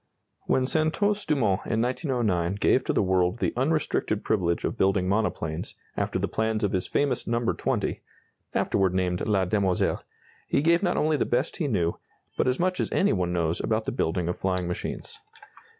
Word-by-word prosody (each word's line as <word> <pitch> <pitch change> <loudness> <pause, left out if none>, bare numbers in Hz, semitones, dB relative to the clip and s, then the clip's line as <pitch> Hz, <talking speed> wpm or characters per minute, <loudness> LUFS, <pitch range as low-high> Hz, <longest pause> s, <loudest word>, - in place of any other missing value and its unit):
When 130 - +2
Santos 180 +8 +1
Dumont 115 -11 +2
in 115 - 0
1909 115 - 0
gave 100 - +3
to - - +1
the - - +2
world 95 +1 +2
the - - -1
unrestricted 130 -6 0
privilege 85 -5 0
of - - -2
building 95 -1 +2
monoplanes 95 -6 -1 0.2
after - - -1
the - - 0
plans 110 0 -1
of 100 - +1
his 95 - -1
famous 140 -4 0
No. 115 0 +1
20 - - -1 0.5
afterward 95 -2 +1
named 90 -1 0
La 100 -3 +2
Demoiselle 95 -1 +1 0.5
he 140 - +1
gave 170 +2 +4
not 180 -3 +1
only 155 0 +2
the - - +1
best 125 +5 0
he 160 -6 -1
knew, 85 -9 0 0.4
but - - +1
as 125 0 +1
much 180 +1 +1
as - - -1
any 200 - +3
one 90 -2 0
knows 85 -1 0
about 110 0 0
the - - -1
building 90 -6 -1
of 90 - -3
flying 90 -2 -1
machines. 90 - -5
105 Hz, 180 wpm, -26 LUFS, 90-135 Hz, 0.5 s, gave